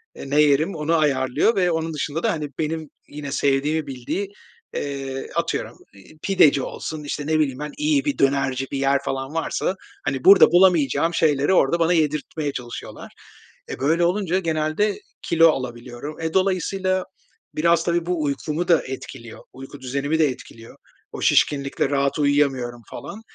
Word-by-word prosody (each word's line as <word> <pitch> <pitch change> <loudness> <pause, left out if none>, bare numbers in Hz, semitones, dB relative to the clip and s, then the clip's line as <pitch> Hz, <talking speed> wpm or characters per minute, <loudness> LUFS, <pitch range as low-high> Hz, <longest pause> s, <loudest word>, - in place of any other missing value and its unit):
eee, 140 - -8
ne 145 +2 +4
yerim 150 +5 +2
onu 160 +2 0
ayarlıyor 140 - +2
ve 180 -2 +2
onun 160 0 -2
dışında 150 +2 -3
da, - - +2
hani, 155 -2 -3
benim, 155 -1 -3 0.2
yine, 145 -1 -7
sevdiğimi 145 +3 0
bildiği, 135 +10 -4 0.5
ııı, 135 -2 -4
atıyorum - - -2 0.2
iii, 100 +10 -17
pideci 155 -8 +4
olsun, 155 +2 -6
işte, 145 0 -4
ne 155 0 +2
bileyim 135 -3 0
ben 150 0 -5
iyi 300 -1 +1
bir 290 - -1
dönerci 135 -1 +1
bir 140 - -2
yer 135 0 +2
falan 135 +2 -3
varsa, 165 +3 -1 0.3
hani, 135 -2 -2
burada 195 0 +9
bulamayacağım 175 -2 +3
şeyleri 150 +2 +2
orada 170 +1 +3
bana 170 +1 +3
yedirtmeye 150 -1 -1
çalışıyorlar. 120 -2 -8 0.6
E, - - -6
böyle 165 +5 +2
olunca 185 0 0
genelde 160 +5 0 0.2
kilo 165 -1 +5
alabiliyorum. 125 +3 -5
E, 160 0 -3
dolayısıyla 185 0 0 0.5
biraz, 170 +1 +3
tabii 170 -1 0
bu 175 -3 -1
uykumu 150 +4 -2
da 170 -3 +4
etkiliyor, 130 -3 -8
uyku 135 +1 -11
düzenimi 140 +5 -1
de 155 - +5
etkiliyor. 115 -3 -9 0.3
O - - -7
şişkinlikle 140 -1 +2
rahat 140 0 0
uyuyamıyorum 135 -5 +1
falan. 220 - -8
150 Hz, 155 wpm, -22 LUFS, 135-170 Hz, 0.6 s, burada